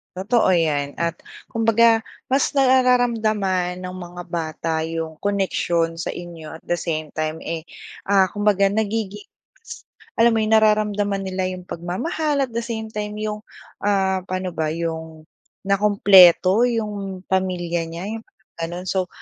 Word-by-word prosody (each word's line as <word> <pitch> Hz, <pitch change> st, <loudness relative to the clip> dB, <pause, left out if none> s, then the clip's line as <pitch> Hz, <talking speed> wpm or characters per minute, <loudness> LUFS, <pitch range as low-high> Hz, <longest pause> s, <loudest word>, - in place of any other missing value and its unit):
Totoo 195 Hz, +2 st, +2 dB
'yan 150 Hz, -5 st, +1 dB
at 170 Hz, 0 st, 0 dB, 0.3 s
kumbaga 225 Hz, 0 st, +3 dB, 0.2 s
mas 270 Hz, +1 st, +2 dB
nararamdaman 225 Hz, -9 st, +2 dB
ng 185 Hz, 0 st, -6 dB
mga 175 Hz, -1 st, -8 dB
bata 165 Hz, -1 st, -3 dB
'yong 160 Hz, -1 st, -4 dB
connection 175 Hz, -4 st, 0 dB
sa 165 Hz, -, -4 dB
inyo 170 Hz, -3 st, -9 dB
at -, -, -39 dB
the 175 Hz, -, +1 dB
same 155 Hz, -3 st, -3 dB
time 155 Hz, 0 st, -2 dB
eh, 165 Hz, -1 st, -5 dB, 0.4 s
ah 195 Hz, -1 st, +4 dB
kumbaga 205 Hz, 0 st, +2 dB
nagiging 210 Hz, 0 st, -2 dB, 1.0 s
alam 230 Hz, 0 st, +5 dB
mo -, -, +2 dB
nararamdaman 210 Hz, -2 st, +2 dB
nila 185 Hz, -1 st, -2 dB
'yong 185 Hz, -1 st, -7 dB
pagmamahal 280 Hz, -, -2 dB
at 255 Hz, -, -5 dB
the 230 Hz, -, -2 dB
same 220 Hz, -2 st, -5 dB
time 210 Hz, -1 st, -4 dB
'yong 215 Hz, 0 st, -3 dB, 0.4 s
ah 190 Hz, -2 st, +1 dB
paano 185 Hz, 0 st, -3 dB
ba 160 Hz, -2 st, -2 dB
'yong 160 Hz, -1 st, -5 dB, 0.4 s
nakumpleto 200 Hz, +1 st, +6 dB
'yong 205 Hz, -5 st, -3 dB
pamilya 175 Hz, -3 st, -1 dB
niya 165 Hz, +2 st, -7 dB
'yong 225 Hz, 0 st, -7 dB, 0.3 s
ganon. 175 Hz, +2 st, -4 dB
So 185 Hz, -1 st, 0 dB
190 Hz, 135 wpm, -22 LUFS, 170-215 Hz, 1.0 s, nakumpleto